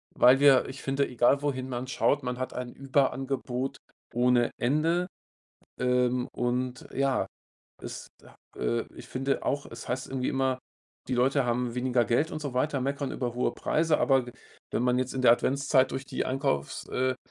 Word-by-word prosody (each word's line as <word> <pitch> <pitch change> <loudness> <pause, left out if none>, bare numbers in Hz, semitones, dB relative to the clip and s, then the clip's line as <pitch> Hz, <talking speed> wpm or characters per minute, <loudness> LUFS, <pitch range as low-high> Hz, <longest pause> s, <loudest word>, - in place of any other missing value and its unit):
weil 125 +2 +6
wir, 140 -2 +6
ich 135 +1 -8
finde, 135 +1 0
egal 125 +3 +3
wohin 130 -3 -2
man 125 0 -4
schaut, 140 +2 +1
man 125 0 -3
hat 130 - -3
ein 125 -1 -5
Überangebot 135 -1 -1 0.4
ohne 120 0 +3
Ende, 160 +8 +1 0.7
ähm, 125 0 +2
und 125 +1 -2
ja, 135 -1 +1 0.6
es - - -7 0.2
a - - -17 0.2
äh, 115 0 0
ich - - -11
finde 135 +2 -1
auch, 140 +1 -1
es - - -9
heißt 125 +1 -2
irgendwie 130 -1 -2
immer, 130 -1 0 0.5
die 130 - +1
Leute 135 +3 +3
haben 120 0 -1
weniger 125 -1 +1
Geld 135 +8 +1
und 155 - -4
so 140 -4 -4
weiter, 140 +2 0
meckern 140 +1 -2
über 120 -2 -3
hohe 125 - +1
Preise, 160 0 +1
aber 135 -3 +3
we - - -7 0.4
wenn - - 0
man 125 0 +2
jetzt 130 0 -2
in 130 - -2
der 120 - +8
Adventszeit 135 +1 +2
durch 135 - -4
die - - -3
Einkaufs 130 - -1
äh, 130 0 0
130 Hz, 175 wpm, -28 LUFS, 125-135 Hz, 0.7 s, der